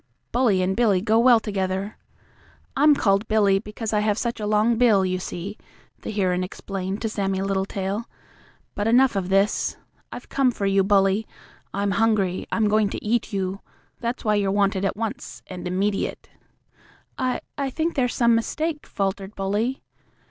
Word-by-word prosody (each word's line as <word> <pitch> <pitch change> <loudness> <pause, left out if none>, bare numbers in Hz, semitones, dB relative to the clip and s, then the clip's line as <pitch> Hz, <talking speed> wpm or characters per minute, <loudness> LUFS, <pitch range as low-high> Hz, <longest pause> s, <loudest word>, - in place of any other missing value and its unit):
Bully 225 -7 +2
and 190 +1 0
Billy 220 -6 +3
go 220 +3 +2
well 240 -1 +6
together. 195 -1 -3 0.8
I'm 295 +2 +5
called 200 -3 +1
Billy 205 -3 +3
because 215 +1 -5
I 210 - +3
have 210 0 +1
such 235 -1 -2
a 210 - -3
long 215 +2 +2
bill, 215 -6 +4
you 185 0 -1
see," 185 +3 -6 0.4
the - - -6
heron 185 -3 0
explained 190 +2 -5
to - - +1
Sammie 195 -3 -1
Littletail. 195 +2 -2 0.7
"But 205 +1 -2
enough 245 0 +4
of 190 -2 -2
this. 195 +2 +1 0.3
I've - - -8
come 270 -2 +2
for 210 -4 -3
you, 195 0 +3
Bully. 195 +1 +2 0.4
I'm 200 0 -1
hungry. 195 -3 +1
I'm 220 -2 +2
going 210 0 +2
to - - -6
eat 230 +2 0
you. 195 -1 -2 0.4
That's 235 +1 -4
why 215 - +3
you're 205 -2 +1
wanted 200 -1 +1
at 195 - -1
once 225 -1 -5
and 180 -1 -7
immediate." 195 +3 -2 0.9
"I 255 -1 -1
I 280 -1 -2
think 320 +5 -1
there's 245 -3 0
some 235 -1 +4
mistake," 300 +7 -1
faltered 195 +1 -3
Bully. 205 +7 -1
205 Hz, 165 wpm, -24 LUFS, 195-230 Hz, 0.9 s, well